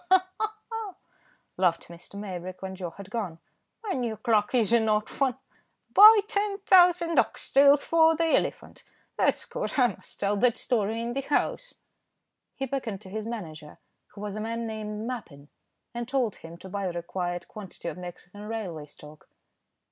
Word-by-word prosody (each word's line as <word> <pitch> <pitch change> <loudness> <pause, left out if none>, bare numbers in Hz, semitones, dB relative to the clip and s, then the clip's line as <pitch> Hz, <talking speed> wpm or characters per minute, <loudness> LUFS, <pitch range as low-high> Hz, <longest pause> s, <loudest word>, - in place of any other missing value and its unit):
"Ha! 370 0 +5
ha! 435 0 -1 0.2
ha!" 445 -4 -5 0.6
laughed 175 -2 +1
Mr. 170 +3 -11
Maybrick 185 -2 -6
when 190 0 -5
Joe 180 -2 -5
had 195 +3 -12
gone, 200 -8 -3 0.5
"my 425 - -3
new 235 -4 -2
clerk 220 0 +1
is 230 -2 +3
an 225 -2 +4
odd 210 0 +2
one; 265 -3 0 0.6
'Buy 425 +1 +10
10,000 370 -5 +4
ox - - -1
tails 280 +1 +6
for 325 -1 +5
the 330 +1 +1
elephant,' - - -3 0.3
that's - - +1
good. - - -4
I 250 -3 +5
must - - -15
tell 205 0 +1
that 240 +2 +3
story 225 -2 0
in 235 +1 -3
the 275 - -1
House." 295 - -1 0.8
He 270 - -3
beckoned 240 -7 -4
to 190 - -11
his 215 +1 -4
manager, 160 -10 -7 0.3
who 205 - -13
was 210 -1 -4
a 215 - -4
man 230 +1 -3
named 215 -1 -5
Mappin, 170 - -7 0.4
and 240 -1 -4
told 255 -5 0
him 165 +1 -11
to 190 - -11
buy 200 0 -2
the 175 - -3
required 175 0 -4
quantity 205 -4 -9
of - - -4
Mexican 180 +3 -9
railway 190 -9 -5
stock. 150 +1 -14
220 Hz, 170 wpm, -27 LUFS, 185-275 Hz, 0.8 s, Buy